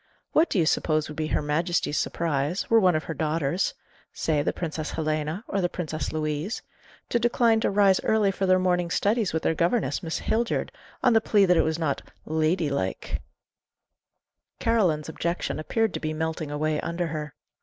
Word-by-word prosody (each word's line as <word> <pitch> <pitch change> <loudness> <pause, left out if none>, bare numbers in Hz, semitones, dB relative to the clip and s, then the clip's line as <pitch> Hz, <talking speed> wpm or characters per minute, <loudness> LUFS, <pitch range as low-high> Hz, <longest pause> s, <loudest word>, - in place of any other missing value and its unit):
What 320 +2 +4
do - - -1
you 170 - +3
suppose 155 -1 +1
would 150 - -7
be 155 0 -2
her - - 0
Majesty's 155 +1 0
surprise, 160 +1 -1
were 230 - +7
one 185 -5 +4
of 155 - 0
her 165 - -4
daughters 155 +3 0 0.4
say, 155 -2 0
the - - 0
Princess 155 -2 -4
Helena, 155 +4 -2
or 195 - -1
the 175 - +1
Princess 155 -4 -4
Louise 155 +6 -2 0.5
to 240 - +2
decline 235 -1 +3
to - - +1
rise 195 -1 +4
early 215 -2 +3
for 195 0 -1
their 185 0 +5
morning 180 -1 +1
studies 210 +3 +1
with 160 - -2
their - - +2
governess, 175 +9 0
Miss 165 -3 -3
Hildyard, 230 +1 0 0.3
on 250 -2 +5
the 225 - +5
plea 205 -2 +4
that 180 -1 +4
it - - +5
was 160 0 0
not 155 -5 -1 0.2
'lady 160 0 +1
like'?" 95 -9 -2 1.4
Caroline's 185 -10 +1
objection 170 0 -2
appeared 220 +6 0
to - - -3
be 155 0 -3
melting 160 0 -3
away 150 +1 -1
under 170 +1 -2
her. 150 -2 -5
165 Hz, 185 wpm, -26 LUFS, 155-195 Hz, 1.4 s, were